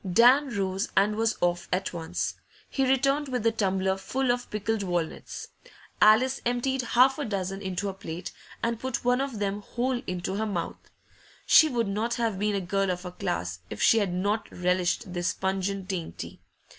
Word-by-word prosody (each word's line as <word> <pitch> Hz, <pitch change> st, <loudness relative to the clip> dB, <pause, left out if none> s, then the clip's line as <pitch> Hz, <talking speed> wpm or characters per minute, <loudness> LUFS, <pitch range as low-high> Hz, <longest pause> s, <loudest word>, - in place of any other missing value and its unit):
Dan 255 Hz, +8 st, +6 dB
rose, 195 Hz, +2 st, -1 dB
and 205 Hz, +2 st, +4 dB
was 225 Hz, +1 st, +1 dB
off 175 Hz, 0 st, 0 dB
at 185 Hz, +1 st, -1 dB
once. 165 Hz, -2 st, -2 dB, 0.3 s
He 270 Hz, -2 st, 0 dB
returned 275 Hz, +2 st, +2 dB
with 250 Hz, -4 st, -2 dB
the 230 Hz, -, +4 dB
tumbler 190 Hz, -3 st, 0 dB
full 260 Hz, +6 st, 0 dB
of 245 Hz, 0 st, -3 dB
pickled 215 Hz, +1 st, -1 dB
walnuts. 175 Hz, -4 st, -3 dB, 0.5 s
Alice 245 Hz, +5 st, +5 dB
emptied 245 Hz, +2 st, 0 dB
half 255 Hz, +3 st, +4 dB
a 290 Hz, -, -1 dB
dozen 195 Hz, -2 st, -3 dB
into 190 Hz, +1 st, -3 dB
her 195 Hz, -, -2 dB
plate, 175 Hz, -2 st, -7 dB, 0.3 s
and 230 Hz, -1 st, 0 dB
put 260 Hz, -1 st, -3 dB
one 250 Hz, +1 st, +3 dB
of 275 Hz, -5 st, -3 dB
them 205 Hz, 0 st, -2 dB
whole 245 Hz, +3 st, -2 dB
into 180 Hz, +2 st, -3 dB
her 220 Hz, +1 st, -1 dB
mouth. 180 Hz, -5 st, -4 dB, 0.6 s
She 315 Hz, -, +7 dB
would 235 Hz, -5 st, 0 dB
not 215 Hz, +4 st, -1 dB
have 225 Hz, -5 st, -1 dB
been 210 Hz, 0 st, +1 dB
a 195 Hz, -, 0 dB
girl 195 Hz, +2 st, 0 dB
of 180 Hz, 0 st, -2 dB
her 180 Hz, -, -6 dB
class 90 Hz, -, -3 dB
if -, -, -7 dB
she 225 Hz, -, +5 dB
had 200 Hz, -4 st, 0 dB
not 205 Hz, +4 st, -1 dB
relished 180 Hz, +2 st, 0 dB
this 175 Hz, -1 st, -1 dB
pungent 190 Hz, 0 st, -2 dB
dainty. 180 Hz, -4 st, -5 dB
205 Hz, 180 wpm, -27 LUFS, 185-240 Hz, 0.6 s, She